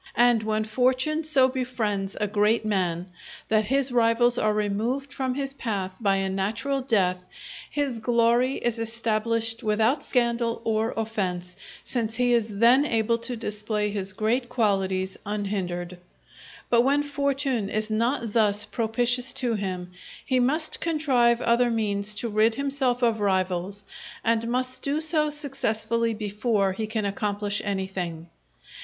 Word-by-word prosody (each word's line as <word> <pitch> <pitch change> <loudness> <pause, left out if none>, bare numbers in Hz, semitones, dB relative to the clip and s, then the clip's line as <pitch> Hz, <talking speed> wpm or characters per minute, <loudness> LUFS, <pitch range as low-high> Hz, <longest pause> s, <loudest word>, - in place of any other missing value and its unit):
And 240 -2 +5
when 215 0 0
fortune 260 +7 +1
so 280 -4 +4
befriends 225 -7 -2
a 210 - +1
great 210 +2 +2
man 180 -3 -1 0.4
that 215 -1 +3
his 270 +3 +1
rivals 240 0 +3
are 215 - +2
removed 220 +7 -1
from 260 -2 -2
his 275 -1 -2
path 205 -8 -3
by 200 -4 +2
a 195 0 0
natural 210 +9 -1
death, 185 -8 +1 0.5
his 280 -5 -2
glory 240 +3 +2
is 240 -1 -2
established 230 0 0
without 220 +5 +1
scandal 235 -2 0
or 225 0 0
offence, 185 -5 -3 0.3
since 225 -3 -2
he 245 0 +2
is 230 -2 +2
then 240 +5 +6
able 230 -4 +1
to 245 +2 -3
display 210 -1 -2
his 195 -2 -3
great 235 +5 0
qualities 195 -5 0
unhindered. 185 -4 -3 0.7
But 235 -1 +4
when 280 +3 +2
fortune 275 -6 -1
is 215 +1 -2
not 230 0 0
thus 210 -2 +2
propitious 245 +2 -1
to 245 -2 -1
him, 185 -4 -4 0.3
he 255 -1 +2
must 300 +6 0
contrive 260 -7 +2
other 235 +1 +3
means 210 -2 -1
to 235 - -2
rid 220 +1 +2
himself 270 -3 -1
of 230 -2 +2
rivals, 190 0 0 0.4
and 230 0 +1
must 255 +1 -1
do 285 +2 0
so 310 -1 +1
successfully 230 -6 -1
before 210 -1 0
he 215 +3 -3
can 215 -1 -2
accomplish 205 0 -2
anything. 190 -4 -4
225 Hz, 140 wpm, -25 LUFS, 205-250 Hz, 0.7 s, then